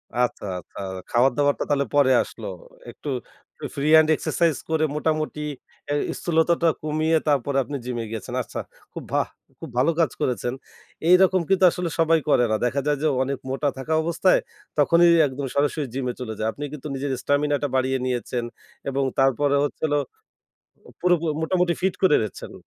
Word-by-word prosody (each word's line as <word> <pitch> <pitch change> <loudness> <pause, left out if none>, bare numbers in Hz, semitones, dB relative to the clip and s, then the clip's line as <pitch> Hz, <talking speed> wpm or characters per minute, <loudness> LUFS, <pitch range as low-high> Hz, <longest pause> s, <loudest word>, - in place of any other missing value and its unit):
আচ্ছা, 125 -3 0
আচ্ছা। - - -13 0.3
খাবার 125 +3 +4
দাবারটা 145 0 +2
তাহলে 140 -1 +2
পরে 140 -2 +5
আসলো। - - -9 0.4
একটু, - - -8 0.4
একটু 480 - -9
ফ্রি 145 0 -1
হ্যান্ড 160 0 +7
এক্সারসাইজ 165 -2 +1
করে 160 -1 +1
মোটামুটি 155 0 -1 0.5
এ - - +2 0.3
স্থূলতাটা 170 0 +2 0.2
কমিয়ে 155 +1 +1
তারপরে 140 -1 +1
আপনি 145 +3 -6
জিম 125 -1 -3
এ - - -6
গেছেন। 110 -4 -6
আচ্ছা, - - -7 0.3
খুব - - -6
ভা - - +2 0.4
খুব - - -8
ভালো 135 +7 +4
কাজ 160 -6 +3
করেছেন। 125 0 -1 0.6
এইরকম 185 0 +5
কিন্তু 195 -1 +3
আসলে 180 0 -3
সবাই 165 0 +4
করে 125 - +4
না। 110 - +3
দেখা 140 +3 0
যায় 145 -1 +2
যে 155 - +2 0.2
অনেক 135 +1 -2
মোটা 135 +2 -1
থাকা 135 +4 -3
অবস্থায় 170 +3 +3 0.4
তখনই 170 +4 +5 0.2
একদম 135 +1 -5
সরাসরি 145 +1 +1
জিম 135 -1 -3
এ - - -9
চলে 110 -3 -4
যায়। 110 - 0
আপনি 145 - -8
কিন্তু 150 0 -7
নিজের 135 +1 -3
স্টামিনা 145 +1 +1
টা 145 - +2
বাড়িয়ে 130 0 +1
নিয়েছেন। 125 -1 -2 0.5
এবং 135 0 0 0.2
তারপরে 135 +2 +3
হচ্ছিল 145 +1 -2 1.1
পুরো 180 0 +4 0.3
মোটামুটি 180 +1 +1
ফিট 190 0 +1
করে 185 -6 +5
ফেলেছেন। 105 - -8
145 Hz, 170 wpm, -24 LUFS, 130-160 Hz, 1.1 s, হ্যান্ড